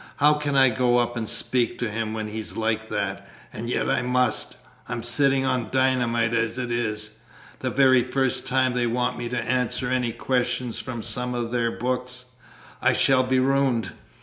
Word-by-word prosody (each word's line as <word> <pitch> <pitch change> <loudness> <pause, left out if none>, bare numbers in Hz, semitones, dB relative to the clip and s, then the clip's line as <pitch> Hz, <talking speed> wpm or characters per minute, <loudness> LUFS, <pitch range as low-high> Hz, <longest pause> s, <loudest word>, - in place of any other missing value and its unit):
How 150 +1 +4
can 150 -1 -2
I 135 -1 +6
go 120 +1 +2
up 120 0 0
and 110 -2 -1
speak 125 -3 +1
to 120 - -2
him 110 0 -3
when 110 -1 -3
he's 110 0 -6
like 110 0 -1
that? - - -3 0.2
And 115 +2 -5
yet - - 0
I - - +1
must. 125 -2 0 0.3
I'm 115 - -4
sitting 135 +2 +3
on 125 -4 -1
dynamite 125 -3 +1
as 115 0 0
it 125 -2 -3
is. 110 -2 -3 0.4
The - - -2
very 130 -2 +4
first 130 +1 0
time 130 -1 +2
they 120 -1 0
want 125 +2 0
me 120 -1 -4
to 125 - -3
answer 125 0 -1
any 125 -2 0
questions 125 0 -1
from 120 -3 -6
some 125 0 0
of 120 -1 -3
their 120 -1 +1
books, 125 +1 -3 0.6
I - - +3
shall 130 -1 +4
be 130 0 +1
ruined! 135 -3 +1
125 Hz, 185 wpm, -24 LUFS, 115-130 Hz, 0.6 s, I